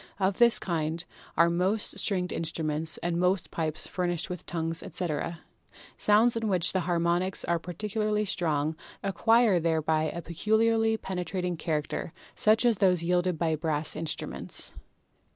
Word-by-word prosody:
Of 190 0 0
this 235 -1 +6
kind 165 -4 -2 0.3
are 170 +1 +6
most 190 +5 0
stringed 180 -3 0
instruments 160 -1 -1
and 170 0 0
most 180 0 +1
pipes 155 -1 -2
furnished 175 0 -2
with 180 - -7
tongues, 165 -1 -1
etc. 170 -1 -3 0.5
Sounds 220 +3 +4
in 225 -1 -1
which 185 -4 +3
the 190 - +2
har 175 - +2
monics 175 +2 +1
are 170 -1 +1
particularly 210 +4 -2
strong 155 -5 0 0.3
acquire 220 +1 +3
thereby 160 -1 +1
a 170 +2 -4
peculiarly 220 +6 +1
penetrating 180 -2 -3
character, 155 0 -3 0.2
such 220 +3 +3
as 230 -4 +3
those 180 -4 +3
yielded 180 0 +1
by 160 -1 +1
brass 155 -1 -1
in 165 - -4
struments. 155 - -2
175 Hz, 145 wpm, -28 LUFS, 165-200 Hz, 0.5 s, this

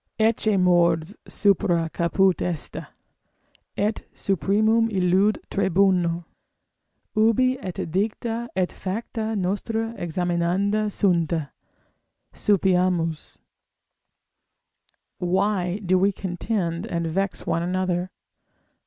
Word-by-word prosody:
ecce 220 -2 +2
mors 170 -1 +3
supra 185 -5 +2
caput 180 +3 +1
est, 170 -4 -3 1.0
et 210 +2 0
supremum 215 +6 +2
illud 190 +1 +2
tribunal, 185 -3 +2 0.9
ubi 230 +4 +3
et 180 -5 -5
dicta 225 +5 -2
et 185 -1 0
facta 220 +3 -4
nostra 220 +4 -2
examinanda 180 +5 0
sunt: 175 -5 +1 1.0
Sapiamus! 180 -5 +1 1.8
Why 185 0 0
do 185 +1 +3
we 195 +2 +3
contend 185 -1 -3
and 170 -5 -2
vex 190 +4 -2
one 165 - 0
another? 180 0 -1
190 Hz, 85 wpm, -24 LUFS, 175-210 Hz, 1.8 s, mors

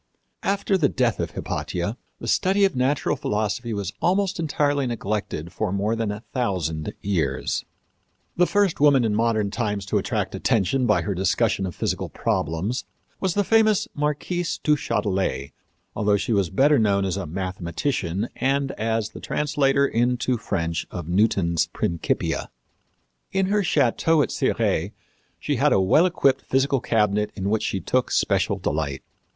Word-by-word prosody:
After 195 -1 +1
the 145 -5 +3
death 120 -5 0
of - - -1
Hypatia, 90 +6 -3 0.2
the - - -8
study 195 +2 +3
of 190 - 0
natural 130 +3 +1
philosophy 110 +3 -2
was 100 -4 -3
almost 190 +1 +1
entirely 145 -3 +1
neglected 105 -7 -3
for 110 -4 -2
more 100 +3 0
than 115 -2 -1
a 105 +2 -7
thousand 90 - -2
years. 80 -10 -1 0.7
The 180 0 +3
first 205 -4 +1
woman 140 -4 +5
in 110 - +1
modern 110 -2 +1
times 105 -4 -2
to - - +1
attract - - -2
attention 115 +5 +1
by - - +3
her 100 - -1
discussion 95 +2 +1
of 90 - -7
physical - - -2
problems 90 - -1 0.3
was 190 -3 -1
the 205 - +3
famous 215 0 +3
Marquise 150 +4 -2
du 150 - +4
Châtelet, 95 - -1 0.4
although 105 -1 +2
she 100 +3 -1
was 100 -4 +1
better 140 - +4
known 100 -3 +2
as 95 -3 -1
a - - -4
mathematician 95 - -2
and 135 +2 +1
as 110 0 0
the - - -10
translator 140 -2 +1
into 120 +1 0
the 115 - -7
French 85 -4 -2
of 85 -3 -6
Newton's 90 -4 +2
Principia. 85 -2 -2 0.8
In 190 0 +1
her 210 +1 +2
château 155 - +2
at - - -3
Cirey - - 0 0.5
she - - -1
had - - +3
a - - +4
well 95 - +4
equipped 135 -6 +2
physical 135 +1 +1
cabinet 105 -2 +1
in 100 0 -2
which 110 - +1
she 95 - -1
took 125 +8 0
special - - +1
delight. 70 -2 -2
115 Hz, 155 wpm, -24 LUFS, 95-145 Hz, 0.8 s, woman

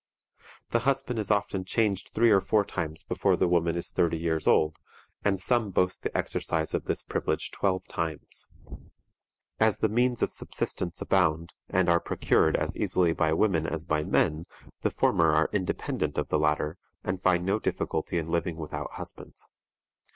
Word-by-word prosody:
The 115 - +3
husband 130 -1 0
is 105 - -3
often 100 -2 0
changed 100 0 0
three 115 0 +3
or 100 -2 +5
four 105 0 +2
times 80 -5 -4
before - - +1
the - - +2
woman 85 -1 +2
is 85 - -4
thirty 85 -1 +1
years 80 -1 -1
old, 75 0 +3 0.4
and 100 -2 +1
some 115 +1 +2
boast 90 -1 0
the - - -2
exercise 80 -1 -1
of - - -1
this - - -2
privilege - - -2
twelve 95 -1 -1
times. 80 -3 -5 1.1
As 110 -2 +3
the - - +2
means 120 +3 +1
of - - 0
subsistence 85 -1 -4
abound, 85 -3 +1 0.2
and 95 -1 +2
are 85 0 +4
procured - - +2
as - - -1
easily 85 -3 +2
by 80 -1 +1
women 80 -3 +2
as 85 -1 -4
by 75 -3 0
men, 75 +1 +1 0.3
the - - +1
former 80 -2 +2
are 80 +1 +2
independent 95 -3 -2
of - - -1
the 75 - +2
latter, 75 +2 0 0.2
and 95 0 -3
find 90 -2 +2
no 100 +3 +1
difficulty 90 - -2
in 80 -1 -2
living 85 0 0
without 75 -2 -5
husbands. - - -9
90 Hz, 170 wpm, -28 LUFS, 80-100 Hz, 1.1 s, or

